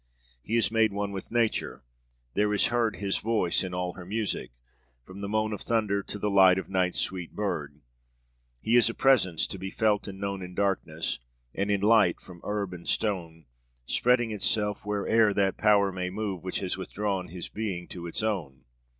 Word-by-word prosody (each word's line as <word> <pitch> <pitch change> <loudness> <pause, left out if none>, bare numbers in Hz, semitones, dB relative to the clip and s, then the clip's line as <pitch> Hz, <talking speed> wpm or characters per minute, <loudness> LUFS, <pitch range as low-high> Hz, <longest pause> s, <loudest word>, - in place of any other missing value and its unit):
He 110 - -2
is 110 -4 +3
made 110 -1 +3
one 100 0 -2
with 95 -1 -6
Nature; 115 - 0 0.5
there 105 0 +2
is - - +3
heard 115 -2 +1
his 100 -1 -1
voice 110 -6 +1
in 95 - -4
all 90 0 -2
her 95 - -9
music, 105 +3 -2 0.5
from 95 +8 -11
the 100 - -4
moan 110 0 0
of 105 - -5
thunder 105 -3 +1
to 105 - -5
the 105 - -2
song 95 -2 +6
of 95 - -4
night's 90 -1 +1
sweet 90 -3 -2
bird; 75 -8 -3 0.8
he 115 - +1
is 120 - +5
a 115 - -5
presence 105 -12 +3
to 95 - -6
be 95 +1 -4
felt 105 0 +1
and 95 -1 -7
known 100 -1 -3
in 90 0 -8
darkness 90 -8 -1 0.3
and 100 +1 -1
in 100 -1 +1
light, 105 -4 +4
from 90 -2 -13
herb 100 -3 -2
and 85 -1 -7
stone, 85 -7 -1 0.4
spreading 120 - +2
itself 105 0 -1
where'er 105 +1 +2
that 95 -1 +1
Power 100 -2 +4
may 90 -1 -3
move 100 -2 -4
which 95 - -3
has 95 0 -2
withdrawn 95 0 -2
his 90 +1 -6
being 95 -5 -4
to 85 -1 -7
its 85 - -3
own 80 -12 -2
100 Hz, 190 wpm, -28 LUFS, 90-105 Hz, 0.8 s, song